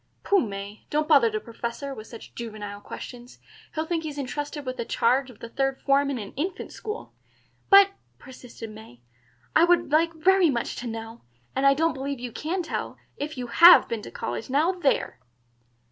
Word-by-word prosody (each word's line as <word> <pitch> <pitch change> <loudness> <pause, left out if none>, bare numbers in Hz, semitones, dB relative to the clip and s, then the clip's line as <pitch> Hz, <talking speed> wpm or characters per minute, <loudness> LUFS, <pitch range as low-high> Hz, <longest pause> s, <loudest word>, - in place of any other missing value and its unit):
"Pooh, 400 - +4
May, 200 - -6
don't 300 +1 0
bother 275 -7 +6
the 215 0 -2
Professor 235 +5 -5
with 215 -4 -10
such 230 - -11
juvenile 210 -3 -7
questions. 245 +3 -9 0.4
He'll 315 0 -1
think 330 0 -1
he's 300 -2 -6
intrusted 290 +1 -4
with 255 0 -4
the 235 - -2
charge 260 +3 +1
of 245 - -14
the 230 - -9
third 270 +2 -1
form 280 0 +2
in 275 - -2
an 205 -3 -7
infant 345 +7 -4
school." 430 0 -7 0.6
"But," 395 0 +8 0.3
persisted 245 -4 -11
May, 215 - -13 0.5
"I 325 - +6
would 345 -3 +3
like 330 +2 +3
very 370 +2 +4
much 235 -4 -2
to 245 - -5
know, 225 0 -7 0.3
and 275 +1 +3
I 275 - +6
don't 325 +2 +2
believe 275 0 -4
you 245 -1 -6
can 345 +9 -3
tell, - - -4 0.2
if 290 0 -5
you 250 - -3
have 335 +10 +8
been 230 -2 -3
to - - -9
college. 120 - -5
Now 300 +7 +3
there!" 350 - 0
270 Hz, 190 wpm, -26 LUFS, 230-315 Hz, 0.6 s, But